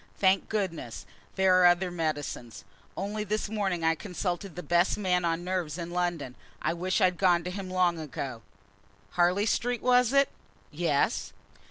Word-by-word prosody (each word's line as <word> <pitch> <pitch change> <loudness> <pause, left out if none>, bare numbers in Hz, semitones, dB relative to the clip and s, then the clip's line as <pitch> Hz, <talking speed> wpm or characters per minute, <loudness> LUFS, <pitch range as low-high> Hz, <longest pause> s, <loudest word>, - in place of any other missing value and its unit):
Thank 190 0 +3
goodness, 180 - -3 0.3
there 185 -1 +4
are 180 - +8
other 175 +1 +3
medicines. 145 -8 -4 0.3
Only 210 +2 -2
this 215 0 -2
morning 195 -6 -1
I 165 0 +4
consulted 180 +1 -4
the 180 - -6
best 175 +1 +2
man 180 -3 +1
on 170 0 0
nerves 180 -4 -2
in 170 -1 -5
London. 175 -7 -2 0.3
I 160 - 0
wish 180 +2 -1
I'd 180 -2 +3
gone 175 -3 +4
to 180 - -4
him 190 0 -5
long 180 -2 +2
ago." 135 -5 -5 0.7
"Harley 180 +4 +2
Street, 240 +2 0
was 250 -1 +4
it?" 275 0 +4 0.4
"Yes." - - 0
180 Hz, 160 wpm, -28 LUFS, 170-195 Hz, 0.7 s, are